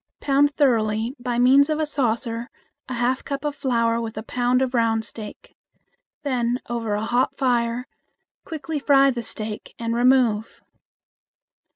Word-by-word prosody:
Pound 285 +1 +2
thoroughly 225 -3 +1
by 245 -1 -2
means 270 +4 +5
of 310 0 0
a 310 - +1
saucer 235 -3 -1 0.4
a 255 - -3
half 245 +2 0
cup 280 +1 -4
of 295 -1 -2
flour 235 -4 +1
with 225 -2 -6
a 215 - -4
pound 245 +2 +1
of 260 -1 -2
round 225 -2 +1
steak. 215 -2 -10 0.7
Then 250 -3 0
over 230 -3 -2
a 210 +1 -2
hot 255 +3 0
fire 240 -1 0 0.6
quickly 320 -1 -4
fry 275 -1 +5
the 240 -2 -4
steak 215 -1 -5
and 230 0 -2
remove. 240 -3 +2
245 Hz, 150 wpm, -23 LUFS, 230-270 Hz, 0.7 s, means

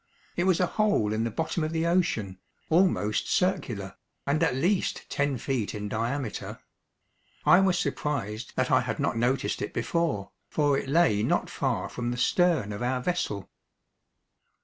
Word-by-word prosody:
It 175 - 0
was 185 -3 +3
a 180 - +4
hole 205 - +1
in 110 +1 0
the - - 0
bottom 160 +6 -2
of 155 - -2
the 165 0 0
ocean, 140 - 0 0.3
almost 160 - +2
circular, 135 - -1 0.3
and 145 +3 +1
at 160 -6 +2
least 180 +8 0
ten 140 -2 0
feet 120 -4 -2
in 105 0 -4
diameter. 115 +3 -3 0.9
I 180 - +7
was 190 -2 +3
surprised 120 -11 -3
that - - 0
I - - +5
had - - -3
not - - 0
noticed 125 +4 0
it - - -4
before, 160 - -1 0.2
for 145 -2 +2
it 135 - -3
lay 140 -10 +3
not - - 0
far - - -1
from 120 -1 -4
the 120 - -3
stern 165 - +2
of 100 - -6
our 125 +1 0
vessel. 125 - -2
140 Hz, 165 wpm, -27 LUFS, 110-170 Hz, 0.9 s, I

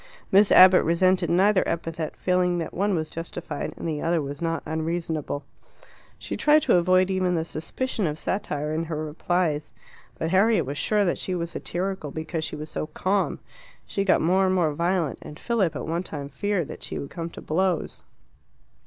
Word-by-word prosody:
Miss 200 +1 +5
Abbott 185 0 +8
resented 180 +1 +2
neither 190 +3 +4
epithet, 165 -1 -3
feeling 180 -1 +1
that 165 -2 -4
one 200 +1 +1
was 155 -2 -1
justified 165 -2 -5
and - - -5
the 150 -2 -2
other 170 0 +1 0.2
not 165 -1 -1
unreasonable. 160 -2 -3 0.7
She - - -5
tried 300 0 +4
to - - +4
avoid 185 +2 +3
even 185 -1 +1
the 160 -1 -1
suspicion 195 - -3
of 150 0 -3
satire 150 -5 -2
in 160 +1 -1
her 155 -1 -3
replies. 155 -1 -1 0.5
But 160 - -2
Harriet 195 -2 +4
was 140 +3 -4
sure 210 -1 +2
that 175 - 0
she 185 - -2
was 170 -1 -3
satirical 185 -3 -3
because 160 +2 -4
she - - -3
was 150 +1 -7
so - - -3
calm. 195 +4 0 0.5
She 195 - -1
got 195 - +3
more 190 +4 +3
and 185 - +2
more 165 -5 +2
violent, 170 -1 0
and 150 - -10
Philip 200 -9 0
at - - -4
one 165 +2 -1
time 145 -6 -6
feared 190 +2 -1
that - - -8
she - - -5
would 140 - -6
come 165 -1 -5
to - - -11
blows. 180 +1 -1
170 Hz, 185 wpm, -25 LUFS, 155-185 Hz, 0.7 s, Abbott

